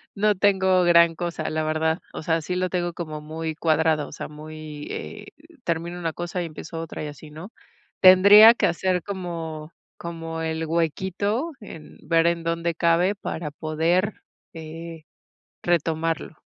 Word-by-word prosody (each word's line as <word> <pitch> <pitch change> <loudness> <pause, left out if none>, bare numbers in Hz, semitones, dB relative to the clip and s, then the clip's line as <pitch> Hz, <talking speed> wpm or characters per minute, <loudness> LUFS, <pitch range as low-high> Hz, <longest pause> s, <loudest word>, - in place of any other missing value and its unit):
no 210 0 +2
tengo 190 -1 +3
gran 170 -1 +5
cosa, 175 0 -3
la 155 0 -1
verdad, 160 +1 0
o - - -6
sea, 165 +1 +1
sí 180 +4 -4
lo 185 0 0
tengo 175 -1 -2
como 155 -3 -6
muy 160 +1 -5
cuadrado, 155 -1 +1
o - - -12
sea, - - -6
muy, 155 0 -9
eh, 210 0 -7 0.4
termino 170 +1 -3
una 165 -2 -3
cosa 175 +2 -4
y - - -3
empiezo 165 +1 -8
otra 165 -1 -6
y - - -4
así, 150 +1 -10
¿no?, 165 +8 -10 0.5
tendría 200 +4 +9
que - - 0
hacer 180 0 0
como 165 -5 -6 0.2
como 165 -1 -6
el 160 0 -2
huequito, 190 - -1
en 165 -8 -12
ver 165 0 +3
en 170 -1 0
dónde 165 0 -1
cabe 170 +4 +2
para 160 -6 -5
poder, 165 +7 0 0.4
eh, 165 0 -9 0.6
retomarlo. 165 -2 -1
165 Hz, 155 wpm, -24 LUFS, 160-180 Hz, 0.6 s, tendría